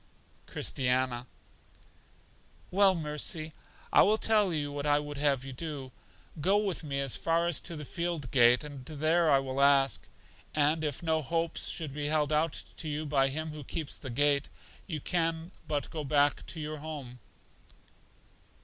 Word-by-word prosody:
Christiana: 125 -1 0 1.4
Well, 195 0 +5
Mercy, 155 0 -1 0.4
I - - +8
will 215 +2 +4
tell 210 -4 +3
you 145 -3 -2
what 145 0 -3
I 145 0 +4
would 145 -1 -4
have 140 -2 +1
you 135 - -7
do. 140 -2 -6 0.5
Go 195 +6 +3
with 200 -5 -1
me 140 -2 -2
as 135 -3 +1
far 165 +1 +1
as 170 -3 +2
to 170 - -6
the 150 -1 -7
field 170 -5 -3
gate, 125 0 +6
and 145 -3 -8
there 155 +3 +1
I 140 - +6
will 135 0 -2
ask; 140 -1 +3 0.5
and 155 +2 +2
if 150 +1 -3
no 160 -1 +1
hopes 165 +3 -1
should 155 -5 -3
be 145 0 -3
held 155 0 +1
out 155 +1 +1
to 160 - -3
you 150 +1 -3
by 140 -2 +2
Him 155 +3 -3
who 150 -1 -8
keeps 155 +2 -4
the 130 - -7
gate, 145 +3 +2 0.4
you 160 -5 -3
can 165 +1 -1 0.2
but 145 -2 -2
go 155 -2 -4
back 145 0 +2
to 165 - -5
your 155 0 -4
home. 145 -5 -7
150 Hz, 165 wpm, -30 LUFS, 140-165 Hz, 1.4 s, I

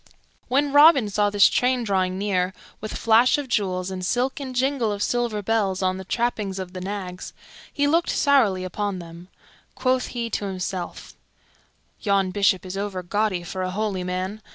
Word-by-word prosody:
When 280 +2 +1
Robin 290 -7 +6
saw 205 +1 +2
this 205 -1 +6
train 250 0 +1
drawing 185 -3 0
near, 190 -2 -1 0.2
with 215 - -5
flash 230 +4 +4
of 290 -2 -4
jewels 190 -5 -1
and 185 -1 -5
silk 250 - 0
and 260 -2 -6
jingle 260 -3 +1
of 205 0 -2
silver 235 -4 -1
bells 195 -3 0
on 185 0 +1
the 190 - -7
trappings 210 -2 -2
of 185 -1 -6
the 185 - -6
nags, 190 -1 -6 0.4
he 285 - 0
looked 330 +4 +2
sourly 230 -10 +3
upon 200 +1 -3
them. 170 0 -10 0.5
Quoth 255 -1 +1
he 235 -1 -4
to 205 - -2
himself, 185 -2 -5 0.9
"Yon 195 -2 +1
Bishop 195 -2 +2
is 185 +1 -6
overgaudy 195 -1 -2
for 185 +2 -5
a 185 - -1
holy 195 -1 -2
man. 185 +4 -4
205 Hz, 170 wpm, -23 LUFS, 185-240 Hz, 0.9 s, Robin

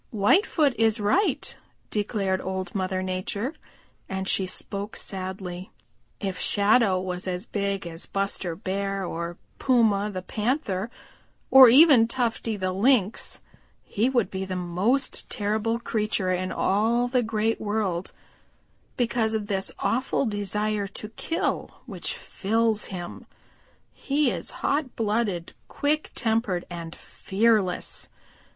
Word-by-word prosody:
"Whitefoot 280 - +3
is 225 -1 +3
right," 285 - +1 0.4
declared 200 -3 0
Old 190 0 -4
Mother 185 -1 -1
Nature, 190 +8 -2 0.6
and 190 0 -3
she 190 -1 +2
spoke 200 +2 -3
sadly. 185 -1 -5 0.5
"If 190 -2 -3
Shadow 205 -1 +3
was 185 0 -3
as 180 +2 -3
big 200 -3 -2
as 165 0 -6
Buster 195 -3 -2
Bear 195 0 -2
or 170 0 -4 0.2
Puma 220 -5 +3
the 185 -3 -5
Panther 215 -2 -1 0.6
or 265 -2 +10
even 265 -3 +7
Tufty 230 -3 -1
the 185 -1 -1
Lynx, 210 +1 +2 0.4
he 225 +5 0
would 240 -7 +1
be 190 0 -3
the 190 -1 -4
most 185 +10 0
terrible 215 +2 0
creature 215 -5 -1
in 185 +1 -2
all 225 +5 +2
the 250 0 +2
Great 225 0 0
World 205 -4 -1 0.9
because 230 -2 +1
of 215 -1 -2
this 195 -1 0
awful 260 +3 0
desire 210 -1 -1
to 210 +2 -7
kill 330 +9 -2 0.2
which - - -4
fills 220 +1 0
him. 175 -2 -7 0.7
He 280 -2 +1
is - - -2 0.2
hot 285 -2 0
blooded, 210 -6 -1
quick 300 +2 -1
tempered 220 -7 0
and 170 -1 -6
fearless. 205 -2 0
205 Hz, 120 wpm, -26 LUFS, 190-230 Hz, 0.9 s, or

